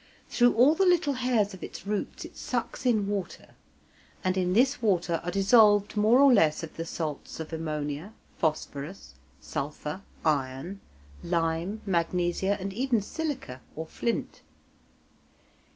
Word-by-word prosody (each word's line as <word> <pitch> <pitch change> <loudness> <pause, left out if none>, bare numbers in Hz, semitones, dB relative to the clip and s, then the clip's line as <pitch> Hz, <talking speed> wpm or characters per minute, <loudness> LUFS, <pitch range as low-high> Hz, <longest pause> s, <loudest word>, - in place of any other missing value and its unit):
Through 245 0 +4
all 255 +7 +6
the 385 - +2
little 350 -6 +3
hairs 245 -5 +1
of 190 - -10
its - - -8
roots 205 0 -3
it - - -12
sucks 250 +1 -3
in 215 -5 +3
water, 200 -2 -4 0.7
and 185 0 +1
in 180 -1 +1
this 260 +5 +3
water 175 -6 +1
are 175 - -3
dissolved 205 +1 +5
more 215 +4 +5
or 280 -2 +7
less 160 -7 +3
of 160 - -8
the 165 - -4
salts 155 -3 -5
of 160 0 -6
ammonia, 155 +2 -3 0.2
phosphorus, 155 +2 -3 0.3
sulphur, 150 +3 -5 0.2
iron, 145 +5 -1 0.4
lime, 170 +4 -1
magnesia, 180 +2 0
and 195 +1 -4
even 245 +1 +1
silica, 260 - -5
or 160 - -4
flint. 230 +7 -3
190 Hz, 135 wpm, -28 LUFS, 160-230 Hz, 0.7 s, or